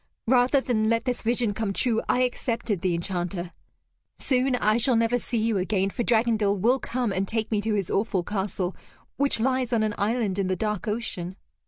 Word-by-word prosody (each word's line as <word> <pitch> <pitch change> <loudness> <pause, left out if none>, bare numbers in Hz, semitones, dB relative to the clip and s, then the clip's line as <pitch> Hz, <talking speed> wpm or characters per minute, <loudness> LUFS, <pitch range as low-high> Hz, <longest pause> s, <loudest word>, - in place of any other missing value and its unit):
Rather 250 +3 +4
than 220 -4 0
let 230 +1 +1
this 250 -2 -1
vision 235 -2 +1
come 210 -1 -2
true, 225 +1 +1
I 250 - +3
accepted 235 -5 -2
the 185 -3 +1
Enchanter. 175 0 -3 0.7
Soon 260 -1 +1
I 215 -2 +2
shall 240 +1 +4
never 230 +2 +2
see 240 - -3
you 220 -2 +1
again, 195 +1 0
for 240 - -3
Dragondel 220 -3 +2
will 240 +7 +2
come 245 -4 -2
and 195 0 -1
take 220 +1 -2
me 210 -2 +1
to 215 0 -1
his 195 -4 -2
awful 195 -3 0
castle 190 -1 -3 0.4
which 280 -4 +2
lies 255 +1 0
on 230 -2 +2
an 215 -1 0
island 205 -2 0
in 195 - 0
the 185 - 0
dark 210 +2 -2
ocean. 200 -5 -3
220 Hz, 195 wpm, -25 LUFS, 195-240 Hz, 0.7 s, Rather